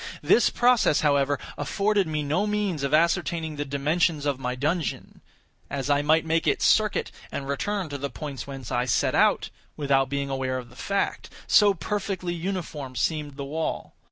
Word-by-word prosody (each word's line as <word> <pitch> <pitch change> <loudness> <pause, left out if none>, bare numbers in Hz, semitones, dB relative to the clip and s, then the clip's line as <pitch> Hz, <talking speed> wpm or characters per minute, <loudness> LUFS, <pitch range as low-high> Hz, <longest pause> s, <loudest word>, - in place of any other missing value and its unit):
This 240 - +5
process, 240 -10 +3
however, 140 -1 +2 0.2
afforded 200 -2 +1
me 155 -1 -2
no 160 +9 0
means 205 -7 -1
of 140 - -1
ascertaining 165 0 +1
the 145 - -1
dimensions 150 +2 0
of 140 -2 0
my 125 -1 -2
dungeon; 155 +4 -2 0.5
as 140 0 -2
I 145 0 +3
might 155 +2 +3
make 165 +1 +1
its - - +2
circuit, 215 -2 +2 0.2
and 135 - -4
return 190 +7 -2
to 140 -1 -5
the 140 +1 -3
point 140 -5 -7
whence 135 -4 -8
I 120 0 +1
set - - +1
out, - - +3 0.3
without 135 -2 +2
being 140 0 -2
aware 130 -1 -1
of 125 -1 -7
the - - -16
fact; 195 +8 -2 0.2
so 205 -2 +5
perfectly 195 -4 -3
uniform 165 -7 -4
seemed 145 +3 -1
the 140 - -4
wall. 155 +3 -3
150 Hz, 175 wpm, -26 LUFS, 140-180 Hz, 0.5 s, This